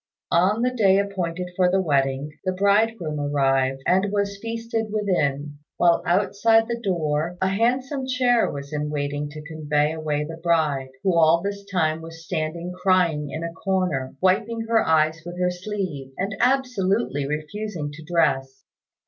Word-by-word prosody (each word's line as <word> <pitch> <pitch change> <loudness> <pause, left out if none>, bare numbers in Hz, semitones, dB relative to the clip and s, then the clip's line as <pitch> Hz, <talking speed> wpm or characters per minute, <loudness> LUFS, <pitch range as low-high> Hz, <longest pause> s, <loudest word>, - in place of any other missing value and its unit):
On 195 +7 +3
the 250 0 +1
day 195 -5 +4
appointed 180 -3 -2
for 180 -1 +3
the 190 +1 +2
wedding, 140 -3 0
the 185 - 0
bridegroom 200 -4 +1
arrived, 135 -2 +1
and 190 +2 +2
was 200 -1 -1
feasted 230 0 -3
within, 150 -9 -1 0.2
while 170 -1 +4
outside 205 +5 +3
the 235 -1 -3
door 165 -3 -1
a 190 - +1
handsome 255 +6 0
chair 250 -2 +2
was 140 +1 -7
in 150 0 -2
waiting 145 0 -2
to 150 +1 -9
convey 150 -1 0
away 155 -2 -2
the 165 +2 -7
bride, 155 -6 +1
who 190 -3 +2
all 165 +1 +4
this 200 0 -4
time 160 -3 +1
was 165 0 -11
standing 170 +3 -3
crying 175 -6 +2
in 155 +4 -5
a 170 0 -4
corner, 180 -9 -1
wiping 215 +5 +1
her 225 0 +2
eyes 160 0 +2
with 175 +1 -8
her 180 0 +2
sleeve, 180 -8 -5
and 195 +2 -2
absolutely 230 - +1
refusing 155 +2 -4
to 155 +2 -11
dress. 140 -5 0
175 Hz, 155 wpm, -23 LUFS, 150-200 Hz, 0.2 s, day